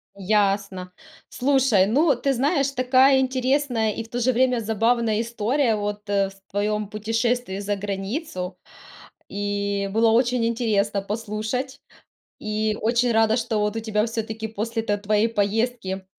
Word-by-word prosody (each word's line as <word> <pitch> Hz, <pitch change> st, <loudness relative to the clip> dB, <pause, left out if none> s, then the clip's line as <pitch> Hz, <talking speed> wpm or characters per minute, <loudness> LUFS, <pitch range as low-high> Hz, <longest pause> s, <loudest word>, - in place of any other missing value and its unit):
Ясно. 200 Hz, -2 st, 0 dB, 0.4 s
Слушай, 260 Hz, -7 st, +3 dB
ну, 280 Hz, +7 st, +3 dB
ты 270 Hz, +3 st, 0 dB
знаешь, 280 Hz, +2 st, +1 dB
такая 260 Hz, +1 st, +4 dB
интересная 255 Hz, -3 st, +1 dB
и 225 Hz, -, -5 dB
в 225 Hz, -, -16 dB
то 245 Hz, -, -3 dB
же 255 Hz, +2 st, +2 dB
время 250 Hz, 0 st, +2 dB
забавная 225 Hz, 0 st, +1 dB
история 235 Hz, +2 st, 0 dB
вот, 205 Hz, 0 st, -4 dB
э, 195 Hz, -1 st, +1 dB
в 195 Hz, -, -15 dB, 0.2 s
твоем 210 Hz, +1 st, -1 dB
путешествии 225 Hz, 0 st, -1 dB
за 205 Hz, 0 st, -2 dB
границу. 195 Hz, -, -4 dB, 0.7 s
И 200 Hz, 0 st, -2 dB
было 225 Hz, +1 st, +3 dB
очень 240 Hz, 0 st, +2 dB
интересно 210 Hz, -4 st, 0 dB
послушать. 225 Hz, +6 st, -4 dB, 0.6 s
И 215 Hz, 0 st, -1 dB
очень 235 Hz, +2 st, +2 dB
рада, 225 Hz, 0 st, +3 dB
что 225 Hz, -2 st, -1 dB
вот 210 Hz, +1 st, 0 dB
у -, -, -1 dB
тебя 215 Hz, -1 st, 0 dB
все-таки 220 Hz, -1 st, -4 dB
после 225 Hz, +2 st, -3 dB
т 205 Hz, -2 st, 0 dB
твоей 210 Hz, +2 st, +1 dB
поездки 210 Hz, -2 st, -1 dB
220 Hz, 140 wpm, -23 LUFS, 205-245 Hz, 0.7 s, такая